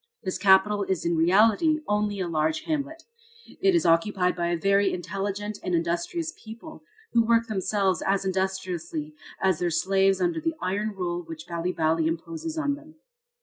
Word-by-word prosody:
This 185 - -3
capital 200 +1 +4
is 190 -3 -2
in 170 0 +1
reality 215 - +4
only 210 -1 0
a 185 - -1
large 155 -1 0
hamlet. 315 +1 -3 0.6
It 385 -1 +4
is 340 - +2
occupied 180 +2 +2
by 170 -1 -1
a 175 0 0
very 195 +3 +2
intelligent 200 +3 -4
and 180 - -1
industrious 170 - -2
people, 220 -6 -10 0.3
who 235 - +5
work 230 0 +3
themselves 195 -3 0
as 195 0 0
industriously 185 -5 -3 0.3
as 190 -4 +1
their 175 -1 0
slaves 195 +3 +2
under 175 -3 0
the 325 -1 -1
iron 205 +3 -2
rule 175 -2 -2
which 165 -1 -9
Bali 170 +1 -2
Bali 160 -1 +1
imposes 320 - -4
on 290 -2 0
them. 305 +2 -12
190 Hz, 165 wpm, -26 LUFS, 170-215 Hz, 0.6 s, who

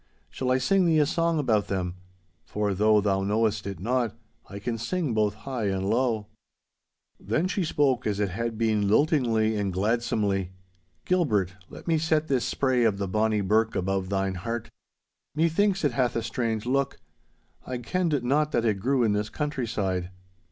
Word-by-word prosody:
Shall 125 +9 -3
I 130 - +4
sing 185 +7 +2
thee 160 -1 +3
a 150 - +4
song 165 +1 +1
about 110 -8 +1
them? 90 -2 -2 0.5
For, 105 -1 -1
though 105 +2 +4
thou 95 -1 +1
know'st 105 0 0
it 100 -4 -5
not, 120 +3 0 0.3
I 100 - -7
can 115 +3 -3
sing 160 +1 -1
both 105 -1 +1
high 120 0 -4
and 95 -1 -1
low.' 115 -3 +1 0.9
Then 155 - 0
she 190 +1 -1
spoke 135 -6 +1
as 105 -1 -1
it 105 -2 +1
had 115 +4 -3
been 110 -3 +1
liltingly 115 -3 +2
and 100 -2 -1
gladsomely. 100 -2 0 0.5
'Gilbert, 110 - +1 0.2
let - - -11
me 165 -2 +2
set 155 -1 +1
this 130 -3 +1
spray 130 -3 +1
of 110 -4 +2
the 100 -1 -2
bonny 110 +2 +1
birk 110 +3 +2
above 95 0 -1
thine 95 -1 0
heart. 115 +2 -4 0.6
Methinks 175 +5 +2
it 145 - +3
hath 125 0 0
a 115 - -1
strange 115 -2 -2
look. 135 +2 0 0.7
I 130 - -3
kenned 150 +2 -1
not 150 +4 +1
that 120 - +1
it 105 -3 +1
grew 130 +4 +1
in 110 -3 +2
this 105 +1 -1
countryside. 110 - -2
115 Hz, 175 wpm, -26 LUFS, 100-140 Hz, 0.9 s, I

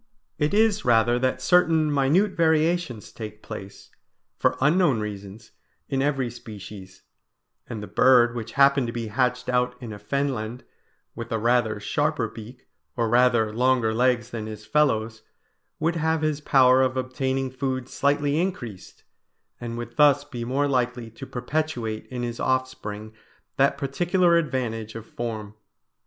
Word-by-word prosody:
It 150 0 +1
is 215 0 +2
rather 120 0 +3
that 130 0 -1
certain 165 -3 +4
minute 150 +9 +3
variations 160 - +1
take 110 -1 -9
place, 100 -3 -9 0.5
for - - +2
unknown 150 -3 +3
reasons, 105 +1 -7 0.4
in 135 -1 0
every 135 -4 0
species; 105 -5 -11 0.7
and 110 -3 -5
the - - -7
bird 120 -2 +4
which 115 -1 -6
happened 140 -2 +4
to 115 - -4
be 115 -2 -4
hatched 125 +2 0
out 125 0 +1
in 120 -4 -7
a 105 - -9
fenland 125 0 -3 0.5
with 115 0 -8
a 115 - +1
rather 115 -1 +1
sharper 145 +4 0
beak 115 +4 -12 0.3
or 115 -2 +1
rather 120 -2 +3
longer 125 -1 +2
legs 120 0 +1
than 110 -2 -5
his 110 0 -8
fellows, 110 -7 +1 0.6
would 165 +2 0
have 160 0 0
his 155 -1 0
power 130 -3 +5
of 130 0 +1
obtaining 130 +1 -2
food 130 -1 -3
slightly 145 +2 +1
increased, 120 - -6 0.6
and 120 -1 -5
would 120 0 -7
thus 145 -1 +5
be 130 -5 -7
more 135 +4 0
likely 125 -3 -1
to 135 +4 -10
perpetuate 125 -4 -3
in 125 -1 -5
his 120 -1 -4
offspring 110 -5 -2 0.4
that 140 +1 +3
particular 175 +5 +2
advantage 120 -9 -2
of 115 -1 -7
form. 110 -3 -5
125 Hz, 145 wpm, -25 LUFS, 115-140 Hz, 0.7 s, power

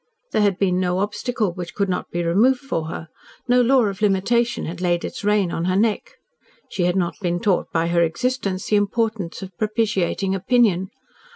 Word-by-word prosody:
There - - +2
had 200 -3 +2
been 185 -2 +1
no 180 -1 0
obstacle 210 0 -1
which 175 -1 -7
could 200 -1 0
not 180 - -3
be 175 0 -2
removed 225 +10 +3
for 165 - -3
her, 160 0 -6 0.4
no 250 0 +4
law 255 +1 +4
of 200 0 -4
limitation 220 +4 +1
had 170 +2 -6
laid 175 -1 0
its - - -7
rein 205 -3 +2
on 165 - -2
her 185 0 +1
neck. 225 - 0 0.6
She 180 - 0
had 180 +1 +1
not 175 -3 -1
been 175 -2 -1
taught 185 -1 0
by 165 0 +1
her 170 0 +2
existence 195 +2 -1
the 210 - +2
importance 205 -3 -1
of 190 -1 -10
propitiating 210 -3 0
opinion. 195 -2 +2
195 Hz, 190 wpm, -22 LUFS, 180-220 Hz, 0.6 s, no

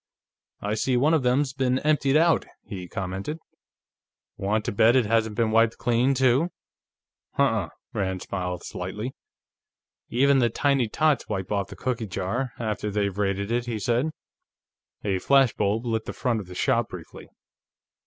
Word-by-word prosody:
"I 105 +1 -1
see 125 +4 +1
one 145 +6 +3
of 160 - +3
them's 130 +2 +1
been 130 -1 +1
emptied 150 -1 +2
out," 165 +1 +3 0.2
he 90 -3 -7
commented. 95 - -4 1.0
"Want 105 +2 -1
to - - -1
bet 110 +4 +4
it 130 -3 +4
hasn't 110 0 +1
been 115 -1 +1
wiped 115 0 +3
clean, 125 +3 +2
too?" 130 +5 +3 0.8
"Huh - - +3
unh." - - +1 0.2
Rand 95 -2 -2
smiled 90 -2 -4
slightly. 105 +8 -5 1.0
"Even 135 +3 +4
the 120 -2 +3
tiny 135 0 +1
tots 155 +1 +1
wipe 95 -3 -3
off 100 -2 0
the - - -10
cookie 120 -4 -2
jar, 100 +8 -2
after 105 -2 -2
they've 100 -2 -1
raided 100 +1 -1
it," 120 +1 0
he 115 -2 -2
said. 120 +8 +1 0.9
A 95 -3 0
flash 135 +2 +4
bulb 105 +3 0
lit 115 -1 -1
the - - -5
front 120 -3 0
of 100 - -8
the 90 - -10
shop 120 +1 +1
briefly. 85 -3 -10
115 Hz, 165 wpm, -25 LUFS, 100-130 Hz, 1.0 s, bet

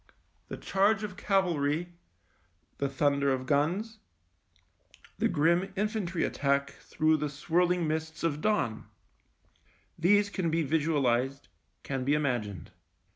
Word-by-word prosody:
The - - -6
charge 200 +2 +1
of 205 -3 -5
cavalry, 175 -5 0 0.9
the 140 - 0
thunder 140 0 +1
of 130 -1 -1
guns, 180 - 0 1.2
the - - +3
grim 170 +5 +2
infantry 205 -4 -1
attack 140 0 0
through 155 0 0
the 150 0 -2
swirling 175 +4 +1
mists 160 +1 -3
of 150 -3 -1
dawn, 205 - 0 1.1
these 205 +4 +3
can 185 -5 -1
be 165 +1 +1
visualised, 140 -4 0 0.3
can 135 -2 -3
be 140 +3 +2
imagined. 120 - -2
155 Hz, 115 wpm, -29 LUFS, 140-180 Hz, 1.2 s, the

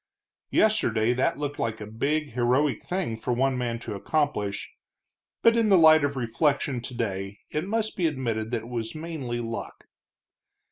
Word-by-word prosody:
Yesterday 120 - +3
that 130 +2 +1
had - - -14
looked 145 -1 -3
like 110 -1 -2
a 105 - -6
big, 145 +8 -1
heroic 125 +5 +1
thing 180 -11 -2
for 125 - -1
one 135 +2 +1
man 120 -2 -2
to 115 - -6
accomplish, 105 -3 -1 0.8
but 230 0 +6
in 225 -2 +3
the 195 - +7
light 160 -2 +7
of 145 0 0
reflection 130 +1 0
today 100 -5 -4
it 155 +4 -2
must 220 +1 -1
be 175 -3 +2
admitted 115 -7 -2
that 115 -2 -2
it - - -10
was 115 +2 -4
mainly 155 -7 -4
luck. 115 -1 -6
125 Hz, 170 wpm, -26 LUFS, 115-155 Hz, 0.8 s, the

